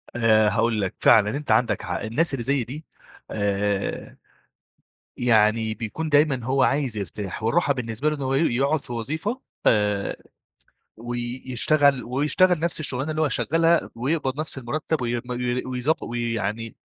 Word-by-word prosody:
آآ، 110 -2 +4
هاقول 110 -1 +1
لك، 95 - -3
فعلًا 105 -1 +5
أنت 145 -1 -3
عندك 115 +2 +2
حق. 90 +1 -3
الناس 140 +10 +1
اللي 120 -3 -2
زي 135 0 +1
دي، 145 +7 -8 0.5
آآ، 100 -1 -2 1.0
يعني 110 -2 +2
بيكون 115 +9 -4
دايمًا 145 -3 +3
هو 130 +2 +1
عايز 135 -4 +1
يرتاح، 100 0 -5
والراحة 145 +6 +2
بالنسبة 125 +3 -2
له 150 - -2
إن 140 - -7
هو 135 0 -1
ي 135 -4 +2
يقعد 140 +3 +1
في 120 - -9
وظيفة، 160 - -3 0.3
آآ، 105 -2 +2 0.8
وي 120 +2 -4
يشتغل 135 +1 +2
ويشتغل 150 +8 +2
نَفس 170 -1 -1
الشغلانة 135 0 -2
اللي 155 0 -1
هو 155 - +2
شغالها، 165 +5 +2
ويقبض 135 +3 -1
نَفس 155 -3 -4
المرتب 145 +4 -2
وي 120 0 -1
وي 125 0 -2
ويضبّ 130 +5 -1
وي 120 -1 -3
يعني، 110 +2 -3
125 Hz, 155 wpm, -24 LUFS, 115-145 Hz, 1.0 s, فعلًا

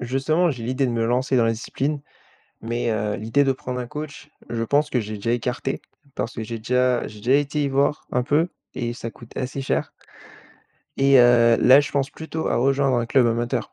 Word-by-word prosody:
justement, 135 +8 +1
j'ai 125 -5 -6
l'idée 130 +2 0
de 125 - -1
me 115 -1 0
lancer 130 +3 +1
dans 120 - +4
la 115 - +2
discipline, 140 +5 -3 0.6
mais, 120 +1 -2
heu, 105 -1 -1
l'idée 115 +7 +1
de 135 - +2
prendre 125 -1 -5
un 120 - -5
coach, 150 +1 -8 0.2
je 115 0 -2
pense 145 +5 +1
que 125 - 0
j'ai 110 0 -5
déjà 110 +3 -2
écarté, 125 +3 -2 0.3
parce 115 - -3
que 110 - -5
j'ai 115 +1 -5
déjà 125 +1 +1
j'ai 105 - -11
déjà 125 +6 +3
été 145 +1 -1
y - - +1
voir, 140 +2 +1
un 125 0 +1
peu, 155 +6 +1 0.2
et 120 -2 -3
ça 115 -1 -6
coûte 115 0 -15
assez 130 +1 -3
cher 135 - -1 1.1
et 135 -1 +5
heu, 120 -1 +6
là, 130 +3 +7
je 145 - -4
pense 140 -1 -1
plutôt 160 +1 -5
à - - +1
rejoindre 135 0 +2
un 120 -1 0
club 125 0 +3
amateur, 115 +1 -1
125 Hz, 215 wpm, -23 LUFS, 115-140 Hz, 1.1 s, là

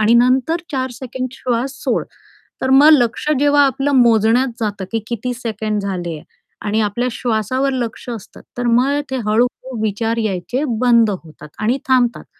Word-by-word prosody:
आणि 215 +2 +4
नंतर 255 +7 +3
4 260 -1 -1
सेकंड 255 0 -4
श्वास 250 +2 -2
सोड." - - 0 0.6
तर 260 - 0
मग 280 +3 +7
लक्ष 245 +1 +2
जेव्हा 290 0 +5
आपलं 270 +1 -1
मोजण्यात 230 +3 +3
जातं, 205 -3 -2
की 225 - +1
किती 240 +1 -3
सेकंड 220 -3 -3
झाले 175 -5 -4 0.4
आणि 215 +1 0
आपल्या 220 +4 0
श्वासावर 245 +4 -1
लक्ष 245 -2 -4
असतं 225 -4 -9 0.2
तर 245 - -1
मग 280 +3 +2
ते 265 - -1
हळू-हळू 245 +2 0
विचार 225 +2 -1
यायचे 220 +6 -2 0.2
बंद 235 -3 +5
होतात 155 -5 -8
आणि 235 +6 +1
थांबतात, 245 -2 +2
240 Hz, 155 wpm, -18 LUFS, 215-260 Hz, 0.6 s, मग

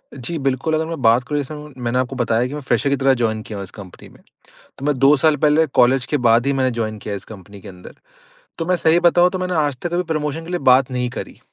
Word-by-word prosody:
जी, 140 +6 -5
बिल्कुल। 135 +3 -1
अगर 160 +1 -1
मैं 165 -3 -6
बात 115 +1 +4
करूँ, 145 +3 -2
जैसे 145 +2 -8
ऊँ, 150 0 -10
मैंने 120 +1 -1
आपको 130 +1 -2
बताया 120 -1 0
कि 135 - -8
मैं 150 - -5
फ्रेशर 140 +1 0
की 140 - +2
तरह 135 0 +2
जॉइन 110 -1 0
किया 105 - -8
हूँ - - -5
इस 95 - -10
कंपनी 95 -4 -13
में। - - -20 0.6
तो 135 - -8
मैं 150 - +2
2 135 +3 +5
साल 155 +1 +2
पहले 150 +2 +3
कॉलेज 130 -2 +2
के 150 - -1
बाद 115 +3 +3
ही 140 - +2
मैंने 130 -1 +1
जॉइन 110 -2 -3
किया 105 0 -6
इस 100 - -7
कंपनी 100 -1 -13
के 100 - -12
अंदर। 90 -1 -12 0.6
तो 165 - -3
मैं 180 - +1
सही 165 0 +3
बताऊँ, 175 +1 +4
तो 185 - -5
मैंने 180 0 -2
आज 145 -4 0
तक 175 0 -4
कभी 180 +1 0
प्रमोशन 155 +1 -2
के 170 - -10
लिए 180 - -2
बात 130 0 +2
नहीं 125 -1 -2
करी। - - -8
135 Hz, 275 wpm, -19 LUFS, 120-155 Hz, 0.6 s, 2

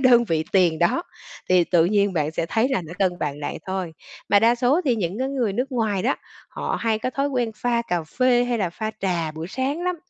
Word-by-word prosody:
đơn 245 -2 +6
vị 160 -5 0
tiền 175 -5 +3
đó, 175 - +2 0.5
thì 180 -2 +5
tự 170 -2 +3
nhiên 200 +1 +2
bạn 155 -2 0
sẽ 165 +1 -2
thấy 230 +3 +2
là 250 -9 0
nó 160 +1 -9
cân 185 -2 +1
bằng 145 -1 -3
lại 145 - -4
thôi. 185 -3 -3 0.4
Mà 205 - +6
đa 230 +3 +4
số 255 +8 +2
thì 250 -5 +2
những 190 +2 -2
cái 265 +1 -1
người 245 -7 -1
nước 255 +5 -2
ngoài 215 -5 0
đó, - - +1 0.3
họ - - -3
hay 225 -2 +1
có 255 +3 -2
thói 275 +2 -1
quen 245 -4 -1
pha 235 0 0
cà 175 -2 0
phê 245 +8 +2
hay 240 -2 -1
là 185 -4 0
pha 215 +4 -4
trà 175 -4 -1
buổi 160 +1 -6
sáng 270 - -2
lắm. 360 0 -1
215 Hz, 245 wpm, -23 LUFS, 175-245 Hz, 0.5 s, đơn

